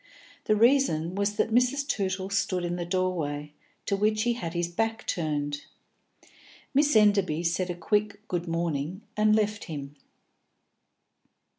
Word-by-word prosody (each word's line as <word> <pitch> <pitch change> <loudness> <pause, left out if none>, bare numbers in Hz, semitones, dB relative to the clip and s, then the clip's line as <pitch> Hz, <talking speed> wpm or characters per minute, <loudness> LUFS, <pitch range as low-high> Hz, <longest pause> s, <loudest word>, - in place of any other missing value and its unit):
The 215 - +3
reason 220 - +3
was 200 +1 0
that 220 - 0
Mrs. 250 +4 +2
Tootle 190 -5 -2
stood 185 -2 0
in 175 0 -2
the 175 -1 -4
doorway, 160 -6 -1 0.3
to 200 - +1
which 215 +2 +1
he 240 0 +2
had 175 -7 -5
his 170 0 0
back 225 +6 -2
turned. 145 -3 -2 1.1
Miss 290 0 +3
Enderby 200 -6 +4
said 175 +2 0
a 175 - -2
quick 210 +3 -1
"good 175 -3 -2
morning" 165 +2 -2
and 215 0 +4
left 210 -1 0
him. 145 -3 -7
190 Hz, 140 wpm, -27 LUFS, 170-215 Hz, 1.1 s, Enderby